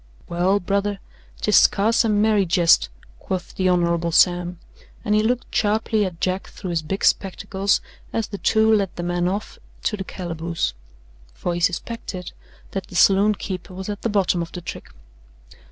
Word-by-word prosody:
"Well, 180 +4 +1
brother, 200 +1 -1 0.4
'tis 210 - +4
scarce 220 +5 +4
a 225 - +1
merry 210 -1 +3
jest," 165 - +4 0.3
quoth 185 -2 -4
the 185 -1 +1
Hon. 170 -1 +1
Sam, 175 +1 +3 0.5
and 210 - +1
he 210 - +4
looked 245 +3 -1
sharply 215 0 +1
at 175 -3 -6
Jack 185 +2 -1
through 185 -3 -7
his 165 -2 0
big 190 +6 -2
spectacles 195 +1 +1 0.3
as 225 - -1
the 200 - -7
two 220 0 +3
led 200 -3 +2
the 175 - -4
man 175 0 0
off 200 +4 -4 0.2
to 210 - 0
the 195 - -4
calaboose: 170 - -3 0.6
for 175 - -2
he 170 - -2
suspected 180 +1 -3 0.4
that 195 -1 -4
the - - -12
saloon 200 +3 +5
keeper 185 -1 -6
was 190 +2 -6
at 205 -1 -4
the 230 - -1
bottom 190 -4 +1
of 165 - -5
the 180 - -6
trick. - - -8
190 Hz, 170 wpm, -22 LUFS, 175-205 Hz, 0.6 s, saloon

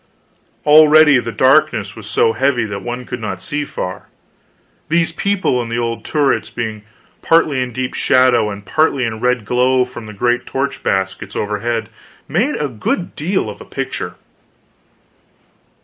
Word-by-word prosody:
Already 150 -2 +7
the 115 -1 -4
darkness 130 -6 +2
was 110 -2 -9
so 115 +1 +2
heavy 130 -3 +1
that 100 -2 -5
one 120 +2 -5
could - - -6
not 95 -4 -4
see 145 +9 -3
far; 90 -9 -6 0.8
these 165 +1 +2
people 190 -8 0
and 115 -1 -6
the 115 - -1
old 115 -1 -2
turrets, 145 -3 0
being 110 -3 -4 0.4
partly 155 -5 +3
in 125 -1 -3
deep 125 +2 -3
shadow 125 -4 +3
and 100 0 -8
partly 140 +1 +1
in 115 - -2
the 110 - -8
red 125 -2 0
glow 125 +2 +2
from 120 -3 -10
the 105 - -9
great 120 +4 0
torch 135 +1 -2
baskets 95 0 -2
overhead, 110 +2 -2 0.4
made 220 - 0
a 150 - -1
good 125 - -3
deal 185 +6 -1
of - - -8
a - - -7
picture. - - -5
125 Hz, 160 wpm, -17 LUFS, 110-145 Hz, 0.8 s, Already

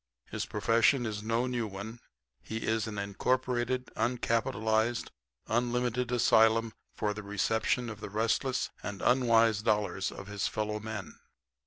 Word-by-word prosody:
His - - -3
profession 115 +4 +3
is 105 -2 -3
no 115 +3 0
new 120 -3 -1
one. 105 +4 -7 0.4
He 110 +9 -5
is 110 -1 0
an 105 -1 -5
incorporated, 125 +4 -1
uncapitalized, 115 -1 0 0.3
unlimited 120 +1 0
asylum 115 -1 +4 0.2
for 105 -1 -1
the 105 - -6
reception 110 +4 0
of 110 -2 -7
the - - -6
restless 115 +5 0
and 100 -1 -6
unwise 115 -4 +4
dollars 105 -3 0
of 100 - -9
his 105 0 -2
fellow 105 0 -2
men. 110 -3 -7
110 Hz, 135 wpm, -30 LUFS, 105-120 Hz, 0.4 s, asylum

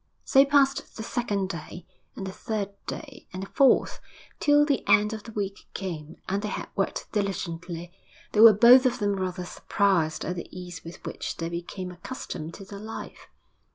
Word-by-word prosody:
So 270 - +6
passed 280 0 +2
the 220 - -4
second 205 -5 -1
day; 170 0 -7 0.3
and 195 - -5
the 190 - -4
third 205 0 -3 0.2
day, - - -7
and 185 +1 -5
the 195 - -8
fourth; 275 -4 +3 0.4
till 295 0 +5
the 285 -3 +1
end 210 +1 +5
of 220 - -5
the 225 - -10
week 200 -2 -4
came, 165 -4 -5
and 195 +2 0
they 210 - -3
had 205 - -4
worked 195 - -2
diligently. 175 -4 -3 0.4
They 210 - 0
were 225 0 +11
both 245 +5 +8
of 250 - -1
them 205 -3 0
rather 185 -1 -3
surprised 175 -5 0
at 180 - -2
the 170 - -5
ease 180 -2 -8
with 165 +1 -11
which - - -5
they 165 0 -3
became 175 +2 -5
accustomed 175 -4 -7
to 195 - -10
their 200 +1 -9
life. 220 +2 -8
195 Hz, 185 wpm, -27 LUFS, 175-220 Hz, 0.4 s, were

